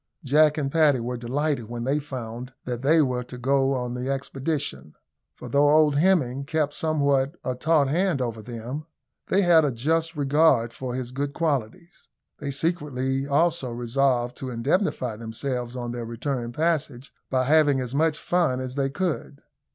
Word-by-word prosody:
Jack 150 +2 +4
and 140 -3 -1
Paddy 150 -5 +4
were 120 +2 -3
delighted 130 +2 -1
when 120 0 -4
they 140 +4 +1
found 125 -3 -7
that 125 -1 -3
they 155 +4 +4
were 125 -2 -1
to 125 +1 -10
go 135 +2 +2
on 125 -1 -3
the 125 +1 -3
expedition; 140 - -3 0.4
for, - - -9
though 145 +1 +3
old 150 0 +5
Hemming 145 -6 +2
kept 150 0 -1
somewhat 140 -2 +1
a 130 - -1
taut 150 +2 +2
hand 170 +1 +1
over 115 -3 -3
them, 120 +7 -6 0.4
they 195 +1 +3
had 170 -3 +6
a 145 - +1
just 160 +7 0
regard 140 -5 +3
for 125 -1 -5
his 125 -1 -4
good 140 +2 -3
qualities. 160 - -3 0.3
They 145 - -4
secretly 135 -3 -1
also 155 -1 +1
resolved 120 +1 0
to 130 - -5
indemnify 125 - -1
themselves 120 +2 -4
on 120 -1 -4
their 120 -1 -5
return 120 +1 -3
passage 140 -3 -1 0.2
by 130 -1 +1
having 145 0 +4
as 125 -1 -4
much 155 +1 +2
fun 170 -8 +1
as 130 -1 -5
they 135 0 0
could. 150 -2 -3
135 Hz, 165 wpm, -25 LUFS, 125-155 Hz, 0.4 s, had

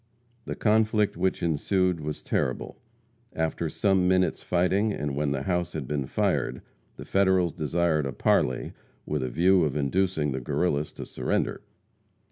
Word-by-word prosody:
The - - -4
conflict 110 -1 +2
which 95 -2 -1
ensued 90 +2 +1
was 75 0 -5
terrible. 65 - -2 0.5
After 80 0 -1
some 95 +1 +2
minutes' 95 0 +2
fighting, 95 +4 +1
and 75 -7 -3
when 75 0 0
the 70 -1 -2
house 90 -2 -1
had 75 -5 -4
been 70 -2 -2
fired, - - -1 0.3
the - - -9
Federals 95 -3 +2
desired 80 -2 0
a - - -3
parley 65 0 +1 0.3
with 75 -2 -2
a 65 - -2
view 90 +6 +4
of 75 -3 -1
inducing 80 +1 0
the 65 0 -3
Guerrillas 75 +2 0
to - - -7
surrender. - - -2
85 Hz, 150 wpm, -27 LUFS, 75-95 Hz, 0.5 s, view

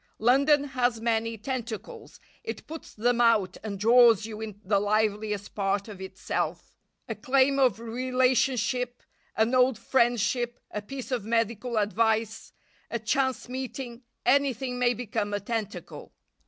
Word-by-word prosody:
London 275 +5 +4
has 250 -4 0
many 230 0 0
tentacles; 230 -2 -6 0.2
it - - -6
puts 320 0 -9
them 240 +2 +1
out 215 -6 +3
and 205 -2 -4
draws 230 -1 +6
you 220 -1 -7
into 210 -2 -7
the 200 0 +3
liveliest 210 0 0
part 200 0 -1
of 200 -3 -9
itself. 190 0 -4 0.3
A - - -2
claim 275 +1 +2
of 250 -6 +3
relationship, 250 0 0 0.3
an 220 +3 +2
old 255 -2 +4
friendship, 240 0 +1
a 210 - -4
piece 265 +5 -8
of 245 -5 -1
medical 230 +1 -1
advice, 220 +1 0 0.4
a 235 - -1
chance 260 +4 0
meeting 255 -1 -6 0.2
anything 260 -1 +1
may 245 -1 +3
become 215 -3 -2
a - - -1
tentacle. 210 0 -5
230 Hz, 135 wpm, -27 LUFS, 215-255 Hz, 0.4 s, draws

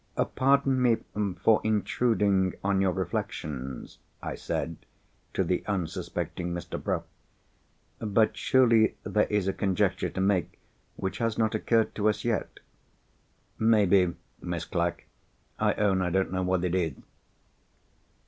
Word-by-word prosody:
"Pardon 135 -1 +3
me 120 -3 +4 0.5
for 110 -1 +5
intruding 105 -3 +1
on 100 -1 +2
your 95 -1 +3
reflections," 75 -7 -4 0.2
I - - -5
said 85 -1 -3 0.6
to 95 - +2
the 90 +1 -1
unsuspecting 90 -1 -3
Mr. 85 - -6
Bruff. - - -1 1.0
"But 110 0 +2
surely 115 -4 +4
there 105 - +1
is 105 -3 0
a 95 - +1
conjecture 95 -3 0
to - - -6
make 95 -3 +1 0.4
which 95 - -4
has 115 -2 0
not 110 -1 +1
occurred 110 +1 +1
to 105 0 +2
us 105 - -2
yet." 115 -2 -2 1.0
"Maybe, 100 -5 +4 0.3
Miss 85 -2 -3
Clack. 85 -1 -2 0.5
I - - +2
own 95 -3 +2
I 90 - 0
don't 95 +1 0
know 95 0 -1
what 90 -1 0
it 90 - -1
is." 85 -5 0
95 Hz, 130 wpm, -28 LUFS, 90-110 Hz, 1.0 s, for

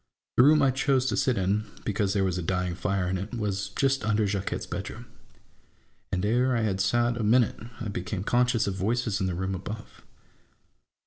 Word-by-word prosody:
The - - +6
room 150 +2 +6
I 135 - +4
chose 130 0 +1
to 105 - 0
sit 130 +2 +1
in, 100 +3 +1 0.2
because 100 -1 0
there 100 -2 +2
was 90 -1 0
a - - -2
dying 90 +1 -1
fire 95 +1 -1
in 95 0 -1
it, 105 +6 -5
was 100 -3 -2
just 135 +5 +1
under 110 0 +2
Jacquette's 100 -1 -2
bedroom; - - -6 1.1
and 95 +1 0
ere 125 +3 +2
I - - +1
had 100 -3 0
sat 120 +5 +2
a 115 - -2
minute, 115 +2 +3 0.2
I 115 - -4
became 95 -1 -4
conscious 120 +1 +2
of 100 - -1
voices 110 +2 -1
in 95 - +1
the 90 - -2
room 95 +2 -2
above. 105 +3 -7
105 Hz, 195 wpm, -27 LUFS, 95-120 Hz, 1.1 s, The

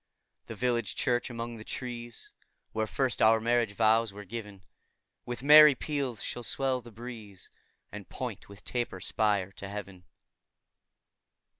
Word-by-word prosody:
The - - -7
village 120 -5 -1
church, 125 -2 0
among 115 -1 -5
the 110 - -9
trees, 120 -1 -7 0.4
Where 110 0 -1
first 130 +1 -1
our 110 +1 +6
marriage 115 -2 +1
vows 110 +1 +3
were 100 0 -10
giv'n, 105 -2 -8 0.6
With 120 +1 -5
merry 150 0 +9
peals 135 -5 -3
shall 120 - -4
swell 130 +2 -1
the 120 - -12
breeze, 110 -4 -10 0.4
And - - -9
point - - -6
with 100 -2 -13
taper 120 -1 -3
spire 100 -3 0
to 95 +1 -9
heav'n. 100 -3 -8
115 Hz, 140 wpm, -29 LUFS, 105-125 Hz, 0.6 s, merry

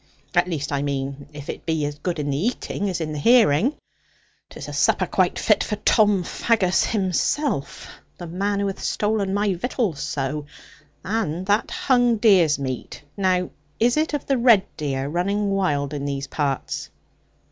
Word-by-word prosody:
At - - +3
least, 150 -5 -3
I 140 -1 0
mean, 140 0 -3
if 145 -1 -10
it - - -6
be 160 -2 -1
as 145 0 -5
good 175 +2 -2
in 145 -1 -2
the 135 - -1
eating 205 -4 -2
as 180 -2 -3
in 155 -1 -3
the 150 - -4
hearing. 230 - +4 0.7
'Tis - - -9
a - - -7
supper - - +2
quite - - +1
fit - - +3
for 210 - -2
Tom 210 -2 +3
Faggus 190 -1 +1
himself, 200 - -1 0.3
the 175 - -7
man 200 +4 -1
who 200 - 0
hath 195 -1 -3
stolen 210 -2 0
my 200 0 +1
victuals 195 - -2
so. 145 0 -3 0.6
And 185 -5 -2
that 205 +3 +1
hung 245 -3 +2
deer's 190 -9 +4
meat, 130 0 -5
now 185 -2 +1 0.3
is 240 +2 +3
it 310 0 0
of 285 - -4
the 270 -3 +1
red 230 -5 +6
deer 135 -3 -2
running 200 +6 0
wild 150 -8 0
in 140 -1 -4
these 140 -1 -3
parts?' 140 -1 -3
180 Hz, 170 wpm, -23 LUFS, 145-210 Hz, 0.7 s, red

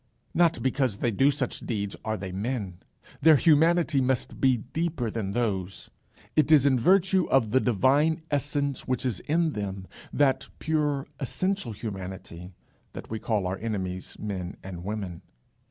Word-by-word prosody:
Not 170 -1 +3
because 130 -5 +1
they 120 - 0
do 135 +7 +4
such 135 -3 -2
deeds 100 -4 -3
are 110 -1 -2
they 95 -1 -6
men. 100 -2 -3 0.4
Their 160 +1 +7
humanity 160 0 +4
must 130 -1 -1
be 130 -2 +4
deeper 135 0 -3
than 100 -3 -3
those. 95 -6 -2 0.4
It 155 0 +3
is 145 -3 +7
in 130 -3 +4
virtue 185 +5 +3
of 120 -6 +3
the 130 - +4
divine 140 - +2
essence 145 -1 -1
which 130 0 -1
is 120 -7 -1
in 160 +1 +1
them, 100 -2 -4 0.3
that 140 -2 +2
pure 150 -3 0
essential 185 +1 -2
humanity, 95 -4 -7 0.4
that - - -9
we 110 - -3
call 105 -4 -1
our 90 +1 -2
enemies 95 -5 -4
men 95 -4 -5
and 90 -2 -7
women. 95 -4 -5
125 Hz, 155 wpm, -27 LUFS, 100-145 Hz, 0.4 s, Their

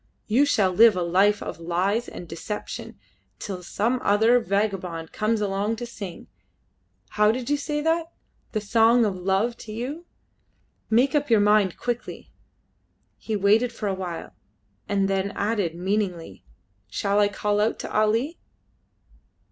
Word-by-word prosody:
You 250 +7 +3
shall 195 -9 +2
live 225 +1 +6
a 180 - 0
life 195 +4 +2
of 165 - -6
lies 185 +7 0
and 175 - -9
deception 170 +6 -6 0.4
till 190 -3 -6
some 230 +8 -1
other 225 +4 +4
vagabond 185 -5 -2
comes 215 0 0
along 205 +2 -1
to 240 +2 -6
sing; 200 -7 -8 0.8
how 210 0 +3
did 250 +3 -4
you - - +4
say 295 +1 -2
that? 325 +1 0 0.4
The 215 - -1
song 230 +2 +4
of 200 -3 -1
love 195 +6 0
to 215 - -10
you! 275 +10 -5 0.8
Make 245 +6 +3
up 290 -2 +1
your 225 -2 +5
mind 205 -3 +3
quickly." 240 -1 -5 0.9
He 220 - -3
waited 210 +5 +3
for 230 -2 -6
a 195 - 0
while, 180 -3 -6 0.6
and 195 -1 +1
then 195 +1 -1
added 200 -5 -1
meaningly 185 -2 -3 0.4
"Shall 200 - 0
I 205 - +5
call 205 0 -1
out 220 - +1
to - - -7
Ali?" 225 +9 +1
210 Hz, 150 wpm, -24 LUFS, 195-230 Hz, 0.9 s, live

